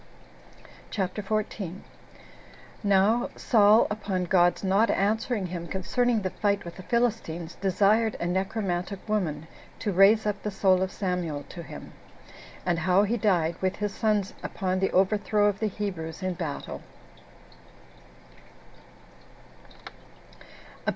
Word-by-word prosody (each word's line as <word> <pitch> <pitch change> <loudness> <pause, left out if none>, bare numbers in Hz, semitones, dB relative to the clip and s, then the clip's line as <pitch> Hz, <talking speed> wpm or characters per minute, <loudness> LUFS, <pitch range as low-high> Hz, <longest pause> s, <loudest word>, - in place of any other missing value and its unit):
CHAPTER 195 0 -2
14. 200 -3 -3 1.1
How 205 +5 +3
Saul 215 -1 +5
Upon 200 -3 -2
God's 175 +1 +3
Not 195 +4 +3
Answering 215 +1 0
Him 175 -1 -5
Concerning 225 +5 0
The 185 - -2
Fight 205 -2 0
With 170 - -8
The - - -8
Philistines 205 -7 -1
Desired 210 +3 +2
A - - -2
Necromantic 190 +1 -2
Woman 165 -8 -1 0.3
To 210 - -2
Raise 200 +4 +5
Up 205 -1 -1
The 210 - -3
Soul 190 -2 +2
Of 190 0 -1
Samuel 180 -7 -2
To 175 - -8
Him; 160 - -10 0.7
And 175 -2 +1
How 185 +4 +3
He 215 +3 0
Died, 180 -7 +1
With 190 0 0
His 205 -1 -3
Sons 210 -3 0
Upon 185 -1 -2
The 195 - +1
Overthrow 205 +2 +2
Of 205 -1 +1
The 220 - 0
Hebrews 185 -4 -5
In 185 0 -1
Battle. 165 -5 -5
195 Hz, 125 wpm, -27 LUFS, 180-210 Hz, 1.1 s, Saul